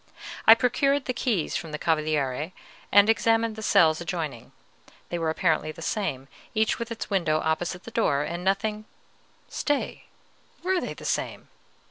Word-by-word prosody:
I 225 Hz, -, +11 dB
procured 275 Hz, +4 st, +1 dB
the 255 Hz, -, -1 dB
keys 230 Hz, -, -1 dB
from 160 Hz, -, -4 dB
the 150 Hz, -, -3 dB
Cavaliere, 155 Hz, -1 st, 0 dB, 0.4 s
and 205 Hz, +1 st, +7 dB
examined 225 Hz, 0 st, +2 dB
the 220 Hz, -, -7 dB
cells 160 Hz, -6 st, +4 dB
adjoining; 160 Hz, -9 st, -4 dB, 0.6 s
they 175 Hz, -, -2 dB
were 165 Hz, -1 st, 0 dB
apparently 160 Hz, -1 st, +1 dB
the 165 Hz, -, -10 dB
same, 160 Hz, -, -2 dB, 0.3 s
each 220 Hz, 0 st, +1 dB
with 235 Hz, 0 st, -4 dB
its 225 Hz, -, -5 dB
window 165 Hz, -5 st, +2 dB
opposite 170 Hz, +3 st, -2 dB
the 230 Hz, -, -9 dB
door, 145 Hz, -11 st, +1 dB
and 170 Hz, +3 st, -4 dB
nothing 210 Hz, +3 st, 0 dB, 0.6 s
Stay, 290 Hz, -2 st, -2 dB, 0.6 s
were 370 Hz, 0 st, +1 dB
they -, -, -5 dB
the -, -, -11 dB
same? -, -, -2 dB
180 Hz, 155 wpm, -26 LUFS, 155-225 Hz, 0.6 s, I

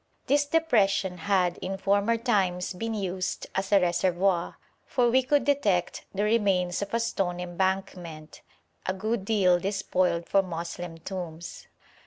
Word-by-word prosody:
This 290 Hz, +1 st, +2 dB
depression 200 Hz, -, +2 dB
had 180 Hz, -1 st, +1 dB
in 190 Hz, +1 st, -4 dB
former 200 Hz, +4 st, +2 dB
times 195 Hz, -7 st, 0 dB
been 225 Hz, +5 st, -3 dB
used 185 Hz, -2 st, -3 dB
as 190 Hz, +1 st, -2 dB
a 200 Hz, -, +7 dB
reservoir, 180 Hz, 0 st, +1 dB, 0.3 s
for 240 Hz, -2 st, +1 dB
we 260 Hz, +2 st, +5 dB
could 285 Hz, +3 st, +1 dB
detect 210 Hz, -12 st, +1 dB
the 200 Hz, +1 st, -1 dB
remains 195 Hz, -5 st, +1 dB
of 200 Hz, +3 st, -3 dB
a -, -, +2 dB
stone 190 Hz, -6 st, -1 dB
embankment, 180 Hz, -3 st, -3 dB, 0.5 s
a 185 Hz, -, 0 dB
good 215 Hz, +2 st, -2 dB
deal 190 Hz, -5 st, +3 dB
despoiled 185 Hz, -3 st, 0 dB
for 195 Hz, -, +4 dB
Moslem 170 Hz, -1 st, -6 dB
tombs. 170 Hz, -1 st, -7 dB
190 Hz, 140 wpm, -27 LUFS, 180-210 Hz, 0.5 s, a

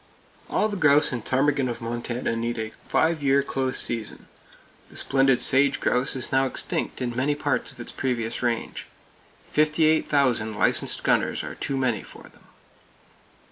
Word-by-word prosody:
All 215 Hz, -, +1 dB
the 205 Hz, -2 st, -4 dB
grouse 150 Hz, -3 st, +4 dB
and 120 Hz, -4 st, -4 dB
ptarmigan 135 Hz, 0 st, +1 dB
of 120 Hz, -, -5 dB
Montana 120 Hz, +1 st, -3 dB
need 115 Hz, +1 st, -2 dB
a 110 Hz, -1 st, -4 dB, 0.2 s
five 160 Hz, -1 st, +1 dB
year 140 Hz, 0 st, +3 dB
close 130 Hz, -1 st, -2 dB
season. 115 Hz, -3 st, 0 dB, 0.6 s
The -, -, -17 dB
splendid 135 Hz, -2 st, +2 dB
sage 140 Hz, +1 st, +3 dB
grouse 125 Hz, +2 st, 0 dB
is 130 Hz, -1 st, -5 dB
now 135 Hz, 0 st, +3 dB
extinct 130 Hz, -, -3 dB
in 120 Hz, -1 st, -3 dB
many 140 Hz, +4 st, 0 dB
parts 145 Hz, -, -1 dB
of -, -, -17 dB
its -, -, -5 dB
previous 120 Hz, -3 st, -2 dB
range. 120 Hz, -2 st, -2 dB, 0.6 s
Fifty 155 Hz, +1 st, +2 dB
eight 155 Hz, 0 st, +2 dB
thousand 120 Hz, -7 st, +1 dB
licensed -, -, +1 dB
gunners -, -, +1 dB
are -, -, -6 dB
too 135 Hz, -, -3 dB
many 125 Hz, -6 st, 0 dB
for -, -, -13 dB
them! -, -, -19 dB
130 Hz, 165 wpm, -25 LUFS, 120-140 Hz, 0.6 s, grouse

